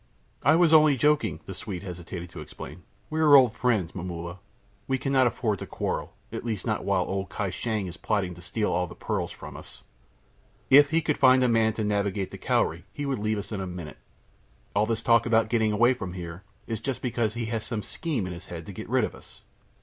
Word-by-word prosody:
"I 155 - +5
was 165 -1 +4
only 155 -3 +7
joking," 150 +3 +2
the 95 - -6
Swede 95 -1 -6
hastened 90 -1 -7
to 90 - -9
explain. 75 +2 -9 0.3
"We 155 - -1
are 150 -2 +7
old 125 -5 +7
friends, 110 -11 +1
Momulla; 85 0 -6 0.5
we 135 - +1
cannot 130 -1 +3
afford 110 -4 -1
to - - -6
quarrel, - - -3 0.2
at - - -5
least 110 -5 -3
not - - -1
while - - +2
old 95 -2 -3
Kai 100 +2 -2
Shang 110 +1 -2
is 85 -1 -7
plotting 100 -5 -1
to 90 - -12
steal 105 +5 -1
all 90 0 0
the - - -11
pearls - - -2
from - - -10
us. - - -11 0.9
If 145 +1 +8
he 165 +2 +2
could 150 -1 -1
find 130 -1 +6
a - - +4
man 115 -2 +3
to 110 - -2
navigate 100 -2 -1
the - - -8
Cowrie 85 +3 0
he 145 +8 -4
would 135 -4 -1
leave 110 +1 0
us 100 - -6
in 100 -3 -3
a 95 - -3
minute. 90 -4 -7 0.8
All 105 +1 +3
his 115 -1 -1
talk 115 0 +4
about 115 -1 +3
getting 110 -2 +2
away 120 +4 +4
from 90 -8 -6
here 85 -1 -7 0.2
is 115 -2 -3
just 130 +2 -4
because 115 -3 0
he 120 -1 -2
has 110 -1 -1
some 110 -4 -4
scheme 150 - -3
in 90 - -4
his 90 +2 -10
head 85 -2 -7
to 100 - -8
get - - -8
rid - - +3
of - - -2
us." - - -16
110 Hz, 225 wpm, -27 LUFS, 90-125 Hz, 0.9 s, If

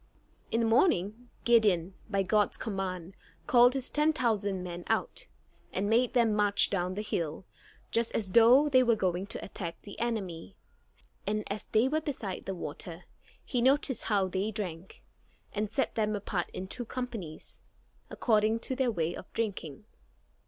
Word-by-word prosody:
In 230 - +1
the - - +2
morning 225 - +2
Gideon, 200 -7 +3 0.2
by 200 -2 +1
God's 205 +2 +2
command 190 -3 -4 0.3
called 245 +1 +6
his 265 -2 -1
ten 300 +1 +3
thousand 205 -8 0
men 175 -1 -6
out, - - 0 0.4
and 195 +2 -1
made 235 +4 +2
them 230 -3 +4
march 205 -1 +3
down 185 -1 -1
the 210 - -3
hill, 165 -3 -3 0.5
just 230 0 +1
as 200 -4 -1
though 240 +7 +7
they 260 -3 +5
were 235 -2 +4
going 185 -1 -1
to - - -6
attack 170 -4 -6
the 200 - -10
enemy. 190 - -3 0.7
And 215 +1 0
as 210 - -5
they 225 +3 +3
were 310 +3 0
beside 235 -11 -5
the 195 - -3
water, 170 +1 -6 0.4
he 245 - -1
noticed 265 0 +3
how 200 -3 +2
they 190 +3 -1
drank, 190 -5 -6 0.5
and 210 0 -1
set 265 +4 0
them 215 -1 0
apart 195 -3 -3
in 190 - -6
two 245 +5 -4
companies, 230 -11 -6 0.5
according 220 0 +2
to 260 - -3
their 260 -1 +1
way 170 -6 -1
of 185 - -10
drinking. 195 -10 -4
210 Hz, 160 wpm, -30 LUFS, 185-235 Hz, 0.7 s, though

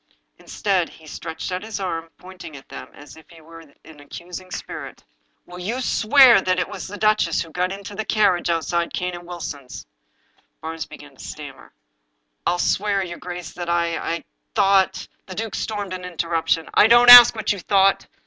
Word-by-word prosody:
Instead, 190 -5 -1
he 160 - -17
stretched 160 +2 -7
out 180 0 -3
his 220 0 -6
arm, 165 -4 -4
pointing 180 -5 -11
at 135 - -16
them - - -9
as 145 +1 -14
if 160 - -18
he 170 - -16
were 165 +1 -14
an 155 0 -17
accusing 175 +5 -10
spirit: - - -8 0.2
" - - -46
Will 180 0 -11
you 220 +8 -3
swear 250 -1 +5
that 185 -1 0
it 180 - -1
was 195 -3 -8
the 205 +2 -8
duchess 215 -6 +1
who 165 - -15
got 180 +3 -2
into 200 +1 -8
the 220 - -4
carriage 205 -6 +1
outside 170 +1 -1
Cane 180 0 -3
and 175 0 -10
Wilson's?" 150 -7 -8 0.7
Barnes 160 0 -6
began - - -14
to - - -12
stammer: - - -10 0.4
" - - -14
ril 175 - +1
swear, 200 +1 0
your 170 -1 -8
grace, 180 -1 -8
that 175 -1 -6
I 170 -1 0 0.2
— - - 0
I - - -8 0.3
thought 195 -2 +3
^* - - -9 0.2
The 185 - -8
duke 220 0 -5
stormed 205 -3 -4
an 185 0 -6
interruption: 165 -2 -1
" - - -39
I - - +6
don't 240 +1 +7
ask 245 -1 +11
what 220 - -1
you 200 - -7
thought. 195 +1 +2
180 Hz, 200 wpm, -21 LUFS, 165-200 Hz, 0.7 s, ask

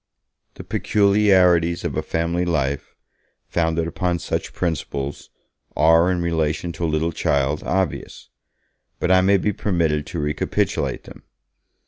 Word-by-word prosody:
The - - -9
peculiarities 95 -5 +3
of - - -3
a - - 0
family 85 +2 -1
life, 70 -5 -2 0.5
founded 80 -1 0
upon 90 +1 -1
such - - -3
principles, 75 -5 -4 0.5
are, 80 +3 +5
in 90 -2 0
relation 80 0 -1
to 85 +1 -7
a - - 0
little 80 +2 0
child, 70 -1 0
obvious; 95 -5 -3 0.7
but 90 - 0
I 95 0 +6
may 100 +2 +4
be 105 +2 -1
permitted 80 -7 0
to 85 - -5
recapitulate 75 0 -1
them. - - -13
85 Hz, 130 wpm, -22 LUFS, 80-90 Hz, 0.7 s, I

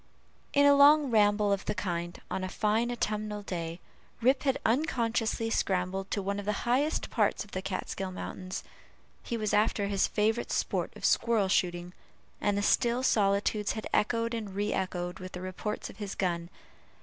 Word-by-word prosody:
In 285 0 +4
a 285 - +7
long 285 -1 +6
ramble 205 -1 +4
of 195 - -3
the 210 - -2
kind, 175 -2 -3
on 190 - -2
a 185 - -3
fine 220 +4 +1
autumnal 215 -3 -2
day, 170 -3 -4 0.4
Rip 260 +3 +3
had 270 -2 +1
unconsciously 230 -3 0
scrambled 190 -1 -1
to 200 - -2
one 200 +1 -2
of 205 - -6
the 210 +2 -2
highest 270 +6 +1
parts - - +1
of 205 - -17
the 185 - -3
Kaatskill 190 0 -4
mountains. 185 0 -6 0.6
He 235 - -3
was 215 -2 -1
after 210 -1 +2
his 200 -1 +1
favorite 220 +2 0
sport - - -1
of - - -5
squirrel 220 -5 +3
shooting, 175 -1 0 0.5
and 205 -1 +1
the 205 - 0
still 240 +4 +2
solitudes 205 -2 +2
had 220 - -5
echoed 230 +2 +1
and 210 -4 -5
re 205 +1 0
echoed 180 -1 -3
with 185 0 -8
the 180 - -6
reports 185 +3 -4
of - - -18
his 205 -2 -5
gun. 170 -3 -1
205 Hz, 175 wpm, -30 LUFS, 190-230 Hz, 0.6 s, a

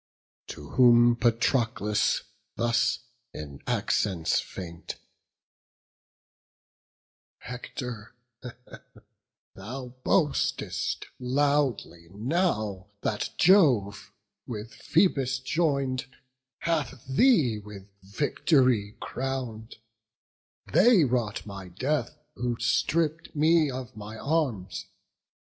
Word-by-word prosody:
To 75 0 -9
whom 120 -1 +6
Patroclus 115 -3 +1 0.3
thus 115 0 +1 0.3
in 70 -2 -8
accents 90 -6 +1
faint: 85 -2 -7 2.4
"Hector, 125 -2 -7 1.4
thou 125 +6 -7
boastest 150 -6 0
loudly 130 - 0
now, 105 - -1
that 105 - -1
Jove, 130 - +4 0.4
With 115 +1 -6
Phoebus 135 -7 +1
join'd, 135 -3 0 0.5
hath 150 -7 -2
thee 135 - +4
with 100 -2 -11
vict'ry 115 - +1
crown'd: 125 -4 -5 1.0
They 230 -8 +6
wrought 120 -5 -1
my 100 -3 -8
death, 130 +9 -2 0.2
who 120 -1 -2
stripp'd 155 +8 0
me 155 0 +4
of 130 -2 -6
my 110 +1 -8
arms. 130 - -2
125 Hz, 75 wpm, -27 LUFS, 105-145 Hz, 2.4 s, whom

